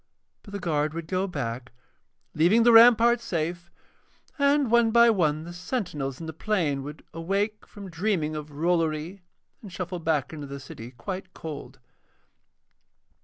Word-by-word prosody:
But 205 - -14
the 200 - -3
guard 155 -3 -1
would 165 -1 -4
go 185 +4 -1
back 125 - -5 0.6
leaving 180 +9 +4
the 240 - +6
ramparts 235 +1 +7
safe, 170 -1 -3 0.7
and 280 -3 +3
one 235 -1 +5
by 235 +1 +6
one 155 -7 +1
the 175 +1 -8
sentinels 175 - -4
in 165 - -7
the 160 - -6
plain 160 -6 -1
would 145 +2 -9
awake 200 +6 -2
from 200 -1 -10
dreaming 170 -3 -1
of 150 0 -6
Rollory 165 +3 -1 0.4
and 205 - -10
shuffle 180 0 -5
back 160 -3 -1
into 150 -2 -7
the 140 0 -7
city 120 -3 -10
quite 185 +9 -7
cold. 155 -3 -8
170 Hz, 150 wpm, -26 LUFS, 150-205 Hz, 0.7 s, ramparts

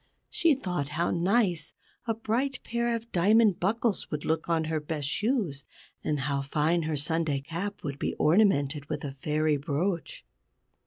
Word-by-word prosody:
She 330 -4 +3
thought 180 - -2
how 170 - +1
nice 180 -2 +1 0.3
a 225 - +1
bright 245 +5 -1
pair 235 0 0
of 230 0 -7
diamond 205 +2 +4
buckles 215 +2 0
would 150 -1 -4
look 160 +1 -1
on 165 -1 +2
her 160 0 -1
best 150 -1 -3
shoes, 200 - 0 0.4
and 150 -2 -1
how 140 0 0
fine 155 +5 +1
her 155 - 0
Sunday 150 0 +1
cap 170 +8 -5
would 140 -2 -4
be - - -2
ornamented 150 -5 +2
with - - -3
a 140 - -3
Fairy 150 +2 0
brooch. 160 +3 -2
165 Hz, 160 wpm, -28 LUFS, 150-210 Hz, 0.4 s, diamond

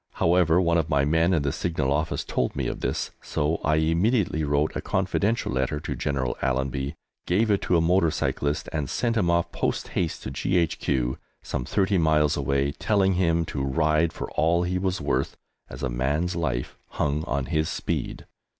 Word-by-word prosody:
However, 85 0 +3
one 85 -2 +3
of 80 - -2
my 70 -2 +2
men 80 +4 +3
in 80 -6 +2
the 70 - 0
Signal 75 -5 -1
Office 80 +3 -1
told 60 - -1
me - - -2
of - - -3
this, - - -2
so 75 +3 -1
I 75 +1 +2
immediately 85 +3 +1
wrote 75 +1 +1
a - - -2
confidential 100 +4 0
letter 65 +3 -1
to - - -4
General 65 -4 -1
Allenby, 65 +2 -1 0.3
gave 105 +5 +2
it 100 - +2
to 90 - +2
a - - +3
motor 85 0 +3
cyclist, 75 0 -1
and 75 -5 -2
sent 115 -2 0
him 95 -6 +2
off 85 0 +1
post - - -2
haste 85 -3 -2
to - - -5
G.H.Q., 70 -5 0 0.2
some 60 - -3
thirty 95 +4 +1
miles 75 -2 +3
away, 70 0 0
telling 95 +4 +1
him 85 -2 +2
to 70 - -4
ride 75 +4 +2
for - - -6
all 85 +3 +2
he 90 +1 -1
was 95 0 -1
worth, - - -1 0.3
as - - -8
a - - +1
man's 70 +9 -1
life 70 -8 -2 0.2
hung 75 +1 0
on 70 -2 -1
his 80 +3 0
speed. - - -3
80 Hz, 185 wpm, -25 LUFS, 70-90 Hz, 0.3 s, However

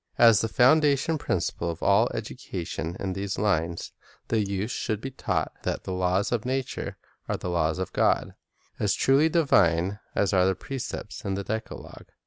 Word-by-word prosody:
As 115 -5 +7
the 115 - 0
foundation 145 +5 +3
principle 85 -6 -1
of 85 - -5
all - - +4
education 85 -1 -5
in 95 -1 -2
these 95 0 -3
lines, 85 -5 0 0.4
the 115 - +2
youth 100 +2 -2
should 110 -3 -2
be 135 +4 -6
taught 130 - -2
that - - -3
the 95 - -4
laws 90 +2 +1
of 120 -3 0
nature 130 0 -3 0.3
are - - 0
the 90 - -4
laws 80 -2 +1
of 95 -1 -4
God, - - +2 0.2
— - - -37
as 105 - +2
truly 140 +4 +4
divine 100 - +3 0.2
as 100 - +1
are 90 -1 +4
the 95 - +1
precepts 135 +6 -6
of 95 -1 -2
the 100 - -3
decalogue. 110 +3 -6
100 Hz, 175 wpm, -26 LUFS, 90-125 Hz, 0.4 s, As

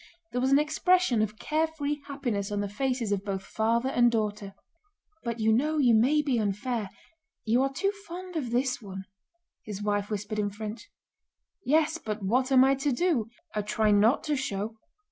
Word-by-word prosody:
There 250 - -1
was 260 +1 +1
an 275 - +7
expression 310 -3 +2
of 215 0 -2
carefree 310 -1 -1
happiness 240 -9 -3
on 205 - -1
the 205 - -2
faces 245 +1 -2
of 200 -1 0
both 195 -2 -3
father 230 +3 0
and 240 -2 +4
daughter. 210 -3 -2 0.7
"But 235 -2 -3
you 220 0 +3
know 300 +7 +1
you 250 -5 +4
may 270 +7 +4
be 265 -5 +1
unfair. 210 +1 -2 0.6
You 235 +3 +3
are 270 0 +1
too 395 +9 0 0.2
fond 360 +1 -8
of 280 -7 -2
this 250 +1 0
one," 195 -2 -7 0.6
his 210 -1 -6
wife 205 -1 0
whispered 210 0 -3
in 205 -1 0
French. 215 - -7 0.7
"Yes, 315 +3 +2
but 215 -6 -5
what 255 +7 +1
am 260 -1 +7
I 270 +1 +5
to 275 +2 0
do?... 270 -5 +1 0.3
I 210 - 0
try 210 +1 +1
not 210 +6 +4
to 300 -2 0
show..." 220 -5 -3
235 Hz, 185 wpm, -28 LUFS, 210-280 Hz, 0.7 s, an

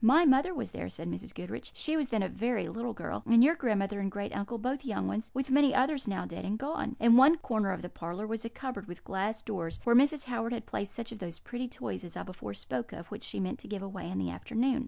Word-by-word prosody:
My 295 +9 +7
mother 275 +5 +5
was - - -4
there," - - -5
said - - -5
Mrs. - - -5
Goodriche - - -6
"she 310 - +1
was 300 -4 +1
then 220 -5 +1
a - - +1
very 230 +3 -1
little 235 +1 -3
girl - - -4
and 235 0 +8
your 305 +5 +7
grandmother 210 -9 0
and 195 -1 0
great 205 +1 -4
uncle, 205 +4 -2
both 255 +5 -2
young 210 - -1
ones; 100 +3 -2
with 270 +1 -2
many 280 0 +5
others 270 0 +2
now 195 - -1
dead 170 - -6
and 205 +2 -1
gone. 270 -1 -2
In 235 +1 +8
one 285 +6 +8
corner 220 -9 0
of - - -4
the - - -3
parlour 175 +6 -5
was 225 +1 -3
a 230 - -3
cupboard 250 -4 -5
with 175 -1 -9
glass 205 +3 -2
doors, 175 -7 -3
where 235 0 +5
Mrs. 285 +3 +5
Howard 240 -1 -1
had 235 - -4
placed 200 - -3
such 235 -1 -5
of 225 - -8
those 170 -3 -6
pretty 245 +1 -4
toys 110 - -5
(as 170 - -7
I - - -3
before 145 - -7
spoke 120 +4 -4
of) 170 - -9
which - - -6
she - - -3
meant 185 -1 -2
to - - -11
give 205 -2 -4
away 195 -1 -5
in 95 - -3
the 90 -2 -1
afternoon. 235 - 0
225 Hz, 265 wpm, -31 LUFS, 190-255 Hz, -, and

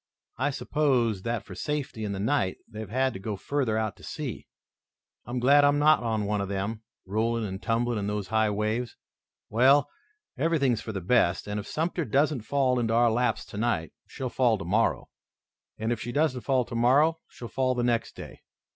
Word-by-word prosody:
I 140 +3 +2
suppose 130 -8 +1
that 115 +2 -2
for - - -9
safety 145 -7 -3
in 105 - -2
the 100 - -4
night 105 -3 0
they've 110 -2 -8
had 130 +3 +1
to 95 - -7
go 105 +1 -4
further 120 +1 -1
out 110 -2 -1
to - - -17
sea. - - -6 0.8
I'm 120 +1 -3
glad 140 +4 +5
I'm 145 0 +4
not 155 +1 +5
on 110 -3 -1
one 105 0 0
of 100 - -4
them, 100 +3 -3 0.2
rolling 110 +3 0
and 95 -1 -5
tumbling 115 +2 0
in 100 - -3
those 105 -2 -3
high 110 -1 +2
waves. 110 +3 -2 0.6
Well, 130 +6 +4 0.5
everything 160 -6 +2
is 115 - -1
for 110 - -6
the 95 -3 -4
best, 90 -3 +2
and 105 0 -2
if 100 - -7
Sumter 170 +2 -1
doesn't 145 -2 +1
fall 130 +2 +1
into 115 -1 0
our 120 0 +4
laps 125 +2 0
tonight 105 -7 -2
she'll 130 - -5
fall 120 -4 +2
tomorrow, 100 +5 0 0.7
and 110 +2 -2
if 115 -3 -2
she 120 - -4
doesn't 145 -3 +1
fall 130 +2 +1
tomorrow 135 +8 +3
she'll 120 - -9
fall 130 +1 0
the 120 - 0
next 120 -1 0
day. - - -10
115 Hz, 190 wpm, -27 LUFS, 105-130 Hz, 0.8 s, glad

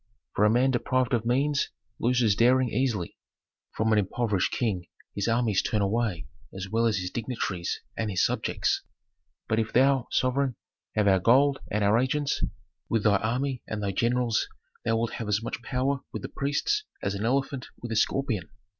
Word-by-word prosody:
For 105 - +3
a - - +5
man 125 +4 +3
deprived 130 +1 0
of 115 -1 +1
means 140 +4 +1 0.3
loses 120 -4 +3
daring 125 +2 +4
easily; 110 -7 -1 0.6
from 110 0 +2
an 105 - +5
impoverished 105 -1 0
king 100 -8 -1 0.3
his 100 +1 -2
armies 115 -4 +2
turn 105 - 0
away 100 -4 0 0.3
as 95 0 -6
well 115 +3 +2
as 110 -3 +1
his 90 -1 -3
dignitaries 110 -7 -3 0.2
and 110 - -2
his 95 - +2
subjects. - - 0 0.7
But 110 - +1
if 110 -1 -1
thou, 135 0 +3
sovereign, 130 0 +1 0.4
have 105 -1 +2
our 95 -1 +5
gold 135 +7 +4
and 105 0 0
our 105 +3 +4
agents, 140 +3 0 0.5
with 115 -3 +1
thy 105 -2 +5
army 125 +5 -1
and 105 -1 -4
thy 100 - 0
generals 120 +2 +1 0.4
thou 115 0 +1
wilt 115 0 -1
have 115 - -4
as 105 +1 +1
much 115 - -4
trouble 130 +3 -1
with - - -6
the - - -5
priests 145 - 0 0.2
as 100 - 0
an 100 +1 -3
elephant 135 +2 0
with 120 - -6
a - - -1
scorpion. 110 -4 0
115 Hz, 180 wpm, -27 LUFS, 105-130 Hz, 0.7 s, a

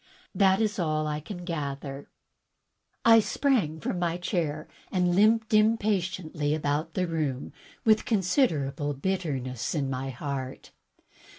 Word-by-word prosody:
That 190 -1 +4
is 215 -2 0
all 155 -2 0
I 150 0 -2
can 175 +3 -8
gather." 140 -4 -5 1.0
I 225 0 +8
sprang 215 - +1
from 175 +4 -2
my 170 -1 0
chair 160 -4 -2 0.2
and 180 -2 +2
limped 220 +2 +3
impatiently 185 -8 +1
about 155 +1 -2
the 185 - +1
room 155 -6 -2 0.3
with 220 -1 +5
considerable 165 - +1
bitterness 135 -7 -2
in 135 -3 -1
my 130 +1 -3
heart. 135 0 -5
165 Hz, 120 wpm, -27 LUFS, 145-195 Hz, 1.0 s, I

